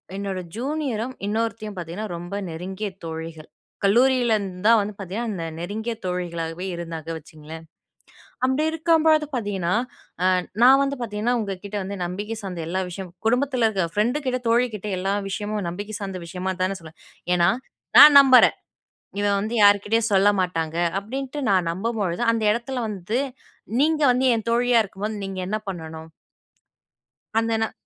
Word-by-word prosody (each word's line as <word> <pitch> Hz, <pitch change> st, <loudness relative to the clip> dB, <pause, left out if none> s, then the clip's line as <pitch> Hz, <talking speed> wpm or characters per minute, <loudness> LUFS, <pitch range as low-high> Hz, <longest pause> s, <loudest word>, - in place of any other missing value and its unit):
என்னோட 195 Hz, -2 st, -3 dB, 0.2 s
ஜூனியரும் 260 Hz, -2 st, -2 dB
இன்னொருத்தியும் 220 Hz, 0 st, -2 dB
பார்த்தீங்கன்னா, 175 Hz, +5 st, -5 dB
ரொம்ப 175 Hz, +3 st, -8 dB, 0.2 s
நெருங்கிய 185 Hz, +5 st, -5 dB, 0.2 s
தோழிகள். 160 Hz, -1 st, -7 dB, 0.4 s
கல்லூரிலருந்து 220 Hz, -4 st, +2 dB
தான் 230 Hz, -1 st, +7 dB
வந்து 205 Hz, +1 st, -4 dB
பார்த்தீங்கன்னா, 205 Hz, +5 st, -4 dB
இந்த 165 Hz, -4 st, -4 dB
நெருங்கிய 220 Hz, +6 st, -3 dB
தோழிகளாகவே 175 Hz, -1 st, -3 dB
இருந்தாங்க 165 Hz, -2 st, -6 dB
வச்சுக்கங்களேன். 160 Hz, +1 st, -11 dB, 0.8 s
அப்படி 265 Hz, +4 st, +2 dB
இருக்கும்போது 320 Hz, -1 st, +3 dB
பார்த்தீங்கன்னா 200 Hz, -6 st, -1 dB, 0.5 s
அ -, -, +5 dB, 0.4 s
நான் 265 Hz, +2 st, +8 dB
வந்து 275 Hz, 0 st, -1 dB
பார்த்தீங்கன்னா 225 Hz, +2 st, -1 dB
உங்க 200 Hz, -2 st, -3 dB
கிட்ட 205 Hz, +1 st, -5 dB
வந்து 200 Hz, +1 st, -5 dB
நம்பிக்கை 205 Hz, +5 st, -4 dB
சார்ந்த 180 Hz, -3 st, -5 dB
எல்லா 185 Hz, +2 st, -1 dB
விஷயமும் 180 Hz, -1 st, -8 dB
குடும்பத்துல 250 Hz, 0 st, +2 dB
இருக்க. 190 Hz, -5 st, 0 dB
ஃப்ரெண்டுக்கிட்ட 255 Hz, +4 st, 0 dB
தோழிகிட்ட 230 Hz, -3 st, +1 dB
எல்லா 195 Hz, +2 st, -1 dB, 0.2 s
விஷயமும் 205 Hz, +1 st, -3 dB
நம்பிக்கை 205 Hz, +5 st, -6 dB
சார்ந்த 195 Hz, -2 st, -5 dB
விஷயமா 185 Hz, +2 st, -3 dB
தான 190 Hz, +1 st, 0 dB
சொல்லுவேன். 160 Hz, -1 st, -14 dB, 0.4 s
ஏன்னா 170 Hz, 0 st, +4 dB, 0.5 s
நான் 290 Hz, -1 st, +11 dB
நம்புறேன். 260 Hz, -2 st, +6 dB, 0.6 s
இவன் 200 Hz, -1 st, +2 dB
வந்து 220 Hz, +3 st, -3 dB
யார்க்கிட்டயும் 205 Hz, +2 st, +4 dB
சொல்ல 195 Hz, +1 st, +5 dB
மாட்டாங்க, 165 Hz, -3 st, -2 dB, 0.2 s
அப்டின்ட்டு 270 Hz, +7 st, -5 dB
நான் 185 Hz, -3 st, +2 dB
நம்பும்பொழுது 200 Hz, 0 st, -2 dB
அந்த 225 Hz, -, -1 dB
இடத்துல 240 Hz, +3 st, -3 dB
வந்து, 210 Hz, +4 st, -3 dB, 0.6 s
நீங்க 310 Hz, +1 st, +2 dB
வந்து 260 Hz, +1 st, +1 dB
என் 225 Hz, -, -5 dB
தோழியா 240 Hz, 0 st, +4 dB
இருக்கும்போது 210 Hz, +3 st, -5 dB
நீங்க 195 Hz, -1 st, -5 dB
என்ன 215 Hz, -, -1 dB
பண்ணணும்? 160 Hz, -3 st, -7 dB, 1.3 s
அந்த 225 Hz, 0 st, 0 dB
ந 220 Hz, -, -1 dB
205 Hz, 140 wpm, -23 LUFS, 180-235 Hz, 1.3 s, நான்